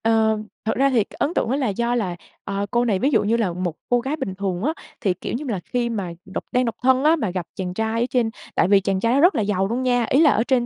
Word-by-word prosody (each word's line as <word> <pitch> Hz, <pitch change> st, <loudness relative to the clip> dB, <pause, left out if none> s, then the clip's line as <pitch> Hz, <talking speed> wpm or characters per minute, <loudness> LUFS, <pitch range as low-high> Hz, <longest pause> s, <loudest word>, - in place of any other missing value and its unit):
Ờ. 220 Hz, -1 st, +3 dB, 0.3 s
Thực 220 Hz, -, 0 dB
ra 275 Hz, +2 st, +3 dB
thì 240 Hz, -5 st, +3 dB
cái -, -, -17 dB
ấn 310 Hz, -, 0 dB
tượng -, -, 0 dB
đó 260 Hz, -, +1 dB
là 275 Hz, -3 st, 0 dB
do 235 Hz, +4 st, 0 dB
là, 190 Hz, -7 st, -1 dB, 0.3 s
ờ, 200 Hz, +1 st, -2 dB
cô 240 Hz, 0 st, +2 dB
này, 205 Hz, -5 st, +1 dB
ví 270 Hz, -, +2 dB
dụ 235 Hz, -7 st, +3 dB
như 225 Hz, +3 st, +2 dB
là, 205 Hz, -7 st, 0 dB
một 175 Hz, -2 st, -3 dB
cô 245 Hz, -, +3 dB
gái 265 Hz, +5 st, -2 dB
bình 190 Hz, -11 st, -4 dB
thường 190 Hz, -1 st, -3 dB
á, 305 Hz, +5 st, +1 dB, 0.3 s
thì, 190 Hz, -, +2 dB
kiểu -, -, -6 dB
như 280 Hz, +6 st, -3 dB
là, 210 Hz, -6 st, -1 dB
khi 240 Hz, -1 st, -1 dB
mà 200 Hz, -6 st, -3 dB
độc 190 Hz, -, -5 dB
đang 250 Hz, 0 st, +2 dB
độc 230 Hz, -, -2 dB
thân 260 Hz, +1 st, +4 dB
á, 310 Hz, +2 st, +5 dB
mà 225 Hz, -, -2 dB
gặp 180 Hz, -2 st, -3 dB
chàng 180 Hz, -1 st, -4 dB
trai 220 Hz, +3 st, -1 dB
ở -, -, +3 dB
trên, 240 Hz, -3 st, +1 dB, 0.3 s
tại -, -, +3 dB
vì 200 Hz, 0 st, +5 dB
chàng 190 Hz, 0 st, 0 dB
trai 230 Hz, +4 st, +1 dB
đó 270 Hz, -, +3 dB
rất 350 Hz, +6 st, +5 dB
là -, -, +1 dB
giàu 195 Hz, -2 st, 0 dB
luôn 240 Hz, +5 st, -2 dB
nha, 245 Hz, -2 st, +2 dB
ý 275 Hz, -, +4 dB
là 305 Hz, -3 st, +6 dB
ở 225 Hz, -, +2 dB
trên 250 Hz, -1 st, +1 dB
230 Hz, 310 wpm, -22 LUFS, 195-255 Hz, 0.3 s, là